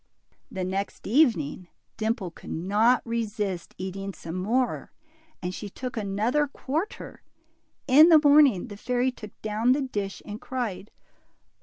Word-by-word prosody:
The 190 -2 -4
next 195 +2 -3
evening 200 - +2 0.3
Dimple 220 -4 -2
could - - -13
not 210 +8 +2
resist 210 -6 -3
eating 195 +1 -5
some 165 - -8
more, 225 +7 -1 0.5
and 180 +1 -2
she 205 +2 -6
took 255 +5 -6
another 220 +8 0
quarter. 300 +7 -4 0.7
In 300 +5 +8
the 325 - +9
morning 285 -8 +5
the 205 - -8
fairy 250 +3 0
took 215 -4 -12
down 220 +3 +2
the 285 - 0
dish 205 -7 -4
and 210 +1 -7
cried. 230 -6 -4
215 Hz, 135 wpm, -26 LUFS, 195-255 Hz, 0.7 s, the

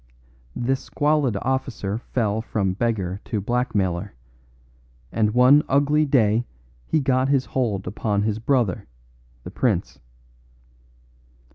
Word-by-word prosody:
This 130 +2 0
squalid 145 -7 0
officer 125 -5 -2
fell 110 -3 -1
from 100 -4 -1
beggar 100 -3 -2
to 110 - -2
blackmailer, 100 - -1 1.0
and 105 -2 +1
one 130 +4 +6
ugly 145 +2 +3
day 115 -4 +3 0.4
he 160 - +2
got 130 -1 +1
his 135 -2 +2
hold 110 -7 -2
upon 105 +1 -1
his 110 0 -1
brother, 115 -6 0 0.6
the - - -8
prince. 70 - -1
115 Hz, 110 wpm, -23 LUFS, 100-130 Hz, 1.0 s, one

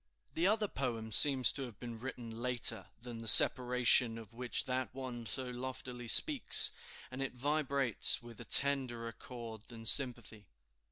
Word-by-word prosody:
The 170 +3 -2
other 215 +1 -2
poem 115 - -7
seems 130 +1 +6
to 140 - -10
have 120 -6 -11
been 120 -2 -11
written 120 -2 -11
later 120 -2 -1 0.2
than 120 -2 -10
the 115 - -9
separation 125 0 +5
of 115 0 -15
which 120 +1 -6
that 130 0 -6
one 125 -3 -10
so 130 +5 -7
loftily 125 -1 -10
speaks; - - +2 0.4
and 130 +1 -10
it 135 -1 -7
vibrates 140 -2 -1
with 120 -2 -16
a - - -13
tenderer 125 -5 -1
chord 115 -2 -13
than 115 -2 -14
sympathy. 120 -5 0
125 Hz, 155 wpm, -30 LUFS, 115-130 Hz, 0.4 s, seems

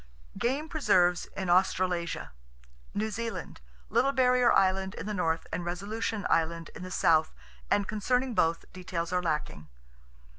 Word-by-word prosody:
Game 275 +6 -1
Preserves 185 - +2
In 190 - -2
Australasia 180 - +1 0.6
New 215 +1 -1
Zealand: 230 - -5 0.3
Little 245 +5 +2
Barrier 250 -2 +4
Island 190 0 +2
in - - -6
the 210 - -3
north, 165 -4 0
and 175 - -2
Resolution 205 +5 -3
Island, 165 0 0
in - - -9
the 185 - -6
south; 160 -3 +3 0.4
and 200 -1 +2
concerning 250 +4 0
both, 165 -5 +1
details 180 -2 -4
are 180 - +2
lacking. 150 - -3
190 Hz, 140 wpm, -29 LUFS, 170-225 Hz, 0.6 s, Barrier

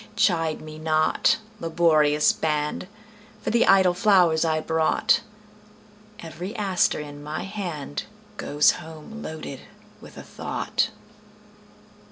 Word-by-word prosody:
Chide 165 -4 +1
me 155 0 -10
not, 155 0 +2 0.2
laborious 155 -3 +3
band, 150 +2 -2 0.6
For - - -1
the 235 +1 +3
idle 190 -2 +5
flowers 180 -5 +4
I 160 -1 +1
brought; 160 0 +2 1.0
Every 180 +5 -7
aster 195 -5 +1
in 145 -1 -8
my 150 +4 -5
handGoes 150 - -1
home 160 +7 -10
loaded 155 -6 -7 0.4
with - - -13
a - - -8
thought. - - -2
160 Hz, 105 wpm, -24 LUFS, 155-180 Hz, 1.0 s, idle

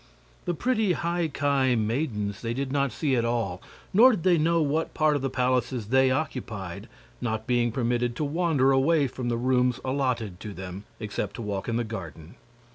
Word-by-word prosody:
The 175 - -1
pretty 220 -3 +1
High 170 0 -1
Ki 140 -3 +1
maidens 110 -3 -1
they 115 0 -2
did 135 0 -2
not 140 -2 +1
see 130 +5 0
at 120 - +1
all, 115 -6 -1 0.3
nor 230 +7 +8
did 180 -7 -3
they 180 -3 +4
know 165 +2 +3
what 155 +1 0
part 155 -1 +3
of 145 - -1
the 135 - -1
palaces 125 -3 0
they 130 +1 +4
occupied, 115 - -3 0.3
not 110 -2 -2
being 120 -1 +1
permitted 120 0 0
to 150 - -2
wander 150 -3 +2
away 140 +3 +3
from 125 -1 -4
the 120 - 0
rooms 125 0 +2
allotted 125 -8 -1
to 105 -1 -7
them, 95 +2 -7
except 105 -2 -4
to 120 - -5
walk 100 +1 -3
in 115 - -1
the 120 - 0
garden. 85 -8 -8
125 Hz, 190 wpm, -26 LUFS, 110-145 Hz, 0.3 s, nor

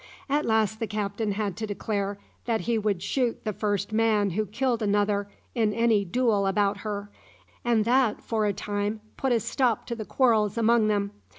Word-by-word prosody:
At 290 +2 +1
last 220 -1 +1
the 225 - -2
captain 210 0 -2
had 200 -2 -2
to 220 0 -3
declare 205 -1 -2 0.3
that 230 -2 0
he 235 0 0
would 200 -4 -1
shoot 245 -1 -1
the 215 - -2
first 205 0 -1
man 215 -3 +2
who 215 +4 -1
killed 240 +3 0
another 205 -1 +1 0.2
in 220 -4 +1
any 230 -3 +3
duel 210 -1 +1
about 200 +1 +1
her, 205 -1 -5 0.5
and 230 -3 +2
that, 245 -2 +2
for 220 -2 0
a - - +2
time, 205 +1 -3
put 265 - -1
a 235 - +4
stop 235 +1 0
to 235 - -4
the 225 - -5
quarrels 220 -3 +2
among 230 -1 +4
them. 200 -1 0
215 Hz, 185 wpm, -26 LUFS, 205-230 Hz, 0.5 s, a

